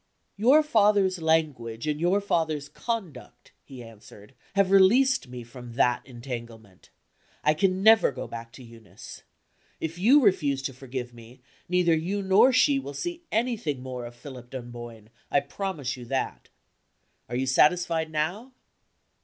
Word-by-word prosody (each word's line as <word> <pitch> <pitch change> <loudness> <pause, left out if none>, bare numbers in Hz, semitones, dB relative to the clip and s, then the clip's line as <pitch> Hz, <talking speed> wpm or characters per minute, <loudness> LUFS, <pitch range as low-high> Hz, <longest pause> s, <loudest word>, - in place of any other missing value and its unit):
"Your 260 +9 +5
father's 205 - +2
language 150 -8 0
and 150 -1 -2
your 180 +4 +2
father's 160 -7 -1
conduct," 190 - -6
he 130 -3 -11
answered, 110 0 -15 0.2
"have 200 -1 +2
released 235 - +4
me 125 -1 -8
from 120 0 -11
that 120 0 +1
entanglement. 115 -5 -9 0.5
I 150 - +4
can 190 +3 0
never 220 -6 +6
go 130 - -6
back 115 0 -8
to 130 - -12
Eunice. 115 -5 -13 0.6
If 165 +2 -5
you 245 +10 +6
refuse 145 - +2
to 135 - -4
forgive 125 -1 -7
me, 120 +1 -15 0.3
neither 180 -2 +3
you 190 +6 -2
nor 190 +7 +5
she 275 +2 +3
will 145 - -8
see 345 - -5
anything 215 - -1
more 125 -2 -6
of 120 - -13
Philip 125 -1 -11
Dunboyne; 120 -3 -9 0.2
I 140 - +3
promise 145 -2 -4
you 125 -2 -10
that. 130 - -3 0.8
Are 120 - -4
you 130 +2 0
satisfied 160 +4 +2
now?" 180 +12 -3
145 Hz, 145 wpm, -26 LUFS, 120-195 Hz, 0.8 s, never